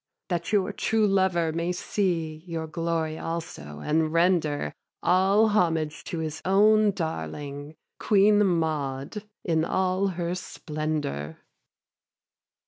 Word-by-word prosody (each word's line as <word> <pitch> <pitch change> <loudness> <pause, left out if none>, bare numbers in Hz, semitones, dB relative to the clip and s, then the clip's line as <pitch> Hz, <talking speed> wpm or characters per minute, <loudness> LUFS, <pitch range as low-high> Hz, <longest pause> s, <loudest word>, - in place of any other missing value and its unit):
That 175 +2 -2
your 205 -1 +1
true 220 +1 +1
lover 190 -4 +2
may 170 +2 -1
see 170 -4 -1
Your 165 -2 -3
glory 160 -1 -2
also, 160 - -6
and 155 - +1
render 165 - +1 0.3
All 195 +4 +4
homage 165 -7 +1
to 170 - -4
his 160 -2 -4
own 210 +3 +5
darling, 145 - -5 0.2
Queen 210 0 +4
Maud 160 0 -1 0.2
in 160 -2 +1
all 185 +3 +1
her 170 0 -1
splendour. 155 - -4
165 Hz, 110 wpm, -26 LUFS, 155-190 Hz, 0.3 s, own